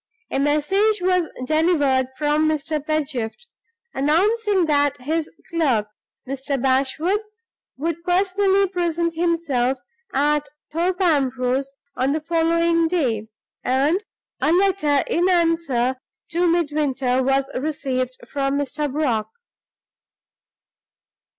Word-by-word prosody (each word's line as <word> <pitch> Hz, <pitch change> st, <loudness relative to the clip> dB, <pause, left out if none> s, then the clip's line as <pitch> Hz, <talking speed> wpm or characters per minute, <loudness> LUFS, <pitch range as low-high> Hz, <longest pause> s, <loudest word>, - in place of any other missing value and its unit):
A -, -, 0 dB
message 345 Hz, +10 st, +2 dB
was 360 Hz, -2 st, +1 dB, 0.2 s
delivered 290 Hz, -4 st, +2 dB
from 300 Hz, +1 st, +2 dB
Mr. 305 Hz, -1 st, -2 dB
Pedgift, 295 Hz, -, -2 dB, 0.5 s
announcing 385 Hz, +7 st, +2 dB
that 290 Hz, -2 st, +1 dB
his 315 Hz, +4 st, -1 dB, 0.2 s
clerk, 260 Hz, -11 st, +1 dB, 0.4 s
Mr. 275 Hz, +1 st, -3 dB
Bashwood, 270 Hz, +9 st, +1 dB, 0.6 s
would 330 Hz, +3 st, -3 dB
personally 390 Hz, +2 st, +2 dB
present 340 Hz, -2 st, -1 dB
himself 320 Hz, -7 st, 0 dB, 0.3 s
at 295 Hz, +1 st, +1 dB, 0.2 s
Thorpe 355 Hz, +4 st, -1 dB
Ambrose 270 Hz, -5 st, +1 dB, 0.2 s
on 260 Hz, +2 st, +1 dB
the 310 Hz, -, 0 dB
following 335 Hz, +1 st, +2 dB
day; 250 Hz, -11 st, 0 dB, 0.4 s
and 285 Hz, +10 st, +1 dB, 0.4 s
a 310 Hz, -, +3 dB
letter 355 Hz, -6 st, +3 dB
in 350 Hz, +2 st, +1 dB
answer 330 Hz, -8 st, +1 dB, 0.3 s
to 350 Hz, +1 st, +2 dB
Midwinter 290 Hz, -6 st, +1 dB
was 270 Hz, +1 st, +1 dB
received 255 Hz, -3 st, -2 dB
from 275 Hz, -1 st, -1 dB
Mr. 285 Hz, 0 st, -2 dB
Brock. 255 Hz, -7 st, 0 dB
300 Hz, 100 wpm, -22 LUFS, 270-340 Hz, 0.6 s, a